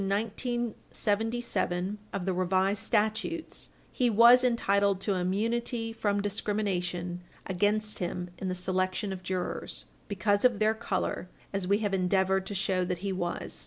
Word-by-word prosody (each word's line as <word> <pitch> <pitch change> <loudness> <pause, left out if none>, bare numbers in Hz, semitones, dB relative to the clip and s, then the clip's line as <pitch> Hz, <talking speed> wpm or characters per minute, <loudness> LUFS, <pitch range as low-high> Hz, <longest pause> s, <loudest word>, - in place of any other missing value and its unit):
1977 220 -2 -1
of 195 -3 -3
the 190 - +1
Revised 185 +2 +1
Statutes, 220 +10 -1 0.2
he 245 -1 +2
was 235 +3 +7
entitled 200 -5 +2
to 200 +1 0
immunity 225 +5 -1
from 205 -2 0
discrimination 180 -4 -2 0.2
against 210 +3 0
him 180 0 -3
in 190 - -3
the 185 - -1
selection 185 +2 -1
of 185 - -7
jurors 185 -1 -4 0.2
because 205 0 +1
of 250 -4 +4
their 215 +1 +3
color, 220 -5 -2 0.2
as 195 -2 -1
we 200 +1 +4
have 200 - -1
endeavored 190 0 +2
to 205 - -4
show 190 -1 +1
that 180 -1 -2
he 195 - 0
was. 175 -2 -3
200 Hz, 140 wpm, -29 LUFS, 185-220 Hz, 0.2 s, was